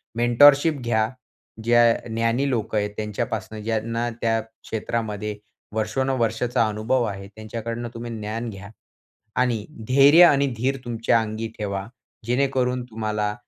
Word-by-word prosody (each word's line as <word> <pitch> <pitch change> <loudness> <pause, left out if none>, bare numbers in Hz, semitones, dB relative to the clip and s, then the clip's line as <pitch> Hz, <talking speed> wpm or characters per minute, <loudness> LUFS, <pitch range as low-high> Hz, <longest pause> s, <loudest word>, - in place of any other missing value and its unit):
Mentorship 140 +5 +5
घ्या. 110 -2 +1 0.5
ज्या 120 +1 +5 0.2
ज्ञानी 115 +4 0
लोक 110 -3 -2
आहेत, 105 -1 +1
त्यांच्यापासून 105 0 -4
ज्यांना 115 +2 -1
त्या 115 -1 +2
क्षेत्रामध्ये 110 -1 -4 0.4
वर्षानुवर्षांचा 115 +1 0
अनुभव 110 +4 0
आहे, 100 -3 -4
त्यांच्याकडनं 115 +2 -5
तुम्ही 120 0 -6
ज्ञान 110 +2 -4
घ्या. 100 0 -9 0.7
आणि 120 -5 0 0.2
धैर्य 140 +6 +7
आणि 140 -4 +4
धीर 135 +4 0
तुमच्या 115 -1 +1
अंगी 110 +1 -4
ठेवा, 100 -2 -3 0.4
जेणेकरून 125 -1 +1
तुम्हाला 110 -2 -2
115 Hz, 115 wpm, -23 LUFS, 110-125 Hz, 0.7 s, धैर्य